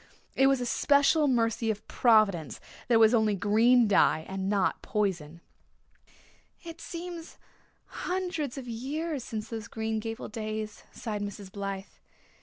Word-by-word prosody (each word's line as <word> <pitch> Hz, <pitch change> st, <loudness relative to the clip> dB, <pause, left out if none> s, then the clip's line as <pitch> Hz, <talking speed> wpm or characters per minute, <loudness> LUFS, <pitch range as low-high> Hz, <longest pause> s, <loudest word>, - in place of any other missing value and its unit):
It 270 Hz, -, +5 dB
was 270 Hz, -1 st, +3 dB
a 245 Hz, -, -2 dB
special 285 Hz, +4 st, +3 dB
mercy 230 Hz, -3 st, +1 dB
of 210 Hz, -1 st, -3 dB
Providence 210 Hz, -, +3 dB, 0.3 s
that 240 Hz, -, +3 dB
it -, -, +7 dB
was 225 Hz, +1 st, +6 dB
only 220 Hz, -3 st, +3 dB
green 225 Hz, +5 st, +4 dB
dye 160 Hz, -5 st, +3 dB
and 190 Hz, 0 st, -3 dB
not 200 Hz, -2 st, +1 dB
poison." 170 Hz, -6 st, -2 dB, 1.2 s
"It 330 Hz, -1 st, -9 dB
seems 340 Hz, -1 st, -7 dB, 0.5 s
hundreds 350 Hz, -7 st, -3 dB
of 260 Hz, -2 st, -7 dB
years 275 Hz, +5 st, -3 dB
since 220 Hz, -2 st, -6 dB
those 225 Hz, -1 st, -6 dB
Green 220 Hz, 0 st, -3 dB
Gables 225 Hz, 0 st, -6 dB
days," 215 Hz, -1 st, -5 dB
sighed 210 Hz, -3 st, -5 dB
Mrs. 205 Hz, -1 st, -6 dB
Blythe. 195 Hz, -1 st, -4 dB
225 Hz, 140 wpm, -28 LUFS, 205-270 Hz, 1.2 s, it